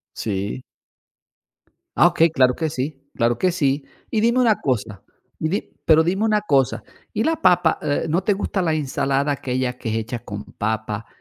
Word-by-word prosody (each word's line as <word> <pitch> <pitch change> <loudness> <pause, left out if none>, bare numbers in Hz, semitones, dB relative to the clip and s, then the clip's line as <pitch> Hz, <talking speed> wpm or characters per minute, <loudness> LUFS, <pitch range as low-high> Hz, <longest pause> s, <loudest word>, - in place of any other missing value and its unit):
Sí. 100 +3 -3 1.3
Ah, - - +7
okey, 165 +1 +3
claro 130 -4 +3
que 160 -2 -1
sí, 135 0 -4
claro 120 0 +1
que 185 -2 +2
sí. 140 -4 0 0.3
Y 215 - +1
dime 235 +3 +3
una 225 -4 +4
cosa, 110 -6 -2 0.4
y 155 - -1
di 200 +6 -3
pero 160 0 +6
dime 190 +6 0
una 215 -1 +3
cosa: 140 -10 +1 0.3
¿y 215 - 0
la 320 +4 +1
papa, 175 -3 +4
eh, 145 +2 0
no 175 +4 0
te 210 - +3
gusta 195 -1 -1
la 160 -3 +1
ensalada 140 -1 0
aquella 130 -2 -2
que 115 - -4
es 110 - -1
hecha 115 +2 -3
con 105 0 -6
papa, 110 0 -3
145 Hz, 180 wpm, -22 LUFS, 125-180 Hz, 1.3 s, Ah